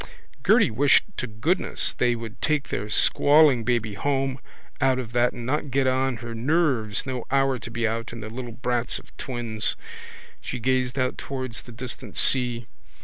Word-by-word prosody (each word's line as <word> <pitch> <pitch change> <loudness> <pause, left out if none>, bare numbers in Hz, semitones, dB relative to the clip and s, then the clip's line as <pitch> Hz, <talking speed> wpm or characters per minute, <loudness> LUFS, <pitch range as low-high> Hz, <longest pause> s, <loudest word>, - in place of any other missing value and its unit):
Gerty - - +4
wished 140 +6 +4
to 130 - -3
goodness 125 - 0
they 120 -1 +1
would 115 +1 -8
take 150 -2 0
their 105 +2 -3
squalling 145 +2 +5
baby 115 -3 0
home 135 +4 -1 0.4
out 130 -1 +3
of 120 -3 -5
that 120 +1 +2
and 120 -1 -8
not 145 +3 -1
get 135 +1 +1
on 130 -1 +1
her 115 - -5
nerves, 125 -4 0
no 130 -3 -4
hour 135 -1 +2
to 115 - -8
be 115 0 -1
out, 115 +1 -3
and 115 -2 -8
the 110 - -6
little 120 0 -6
brats 120 0 0
of - - -15
twins. 120 -4 -2 0.7
She - - -5
gazed 130 +1 0
out 130 -1 -1
towards 130 -4 -3
the 120 - -13
distant 120 +2 -5
sea. 120 -2 +3
125 Hz, 175 wpm, -25 LUFS, 115-135 Hz, 0.7 s, squalling